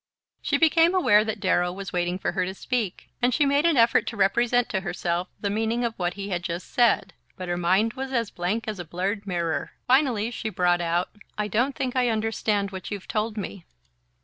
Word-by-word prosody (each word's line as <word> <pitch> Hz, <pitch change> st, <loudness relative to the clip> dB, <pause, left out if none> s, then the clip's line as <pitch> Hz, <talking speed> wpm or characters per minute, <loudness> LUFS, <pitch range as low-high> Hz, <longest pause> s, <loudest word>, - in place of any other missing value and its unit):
She -, -, +1 dB
became 330 Hz, +2 st, +4 dB
aware 215 Hz, -, +5 dB
that 220 Hz, -1 st, -3 dB
Darrow 180 Hz, -2 st, +2 dB
was 195 Hz, +1 st, -7 dB
waiting 175 Hz, 0 st, 0 dB
for -, -, -2 dB
her 185 Hz, -, 0 dB
to 190 Hz, +1 st, -4 dB
speak, 230 Hz, -4 st, -3 dB
and 245 Hz, +1 st, +3 dB
she 295 Hz, -, +3 dB
made 285 Hz, +3 st, +3 dB
an 325 Hz, -5 st, +2 dB
effort 230 Hz, -1 st, +4 dB
to 225 Hz, -, -4 dB
represent 235 Hz, +5 st, +2 dB
to 190 Hz, -, 0 dB
herself 175 Hz, -1 st, -2 dB
the 200 Hz, -, -1 dB
meaning 225 Hz, +3 st, 0 dB
of 230 Hz, -, -1 dB
what 180 Hz, -4 st, -2 dB
he 200 Hz, 0 st, -5 dB
had 175 Hz, -2 st, -1 dB
just 175 Hz, +1 st, -5 dB
said; 240 Hz, -2 st, +3 dB, 0.2 s
but 185 Hz, -2 st, -6 dB
her 175 Hz, -, -1 dB
mind 190 Hz, +6 st, +2 dB
was 265 Hz, 0 st, -5 dB
as 230 Hz, -4 st, -1 dB
blank 205 Hz, +6 st, -2 dB
as 210 Hz, -3 st, -4 dB
a -, -, -3 dB
blurred 195 Hz, +5 st, -3 dB
mirror. 170 Hz, -3 st, -2 dB
Finally 245 Hz, -4 st, +2 dB
she 220 Hz, -2 st, -4 dB
brought 175 Hz, -3 st, +2 dB
out: 170 Hz, +1 st, 0 dB, 0.3 s
"I 210 Hz, 0 st, -1 dB
don't 245 Hz, +6 st, 0 dB
think 255 Hz, -1 st, -2 dB
I 250 Hz, -1 st, +3 dB
understand 215 Hz, -2 st, 0 dB
what 190 Hz, -1 st, -7 dB
you've 205 Hz, -3 st, -6 dB
told 215 Hz, 0 st, -2 dB
me." 200 Hz, -2 st, -5 dB
210 Hz, 215 wpm, -25 LUFS, 180-235 Hz, 0.3 s, aware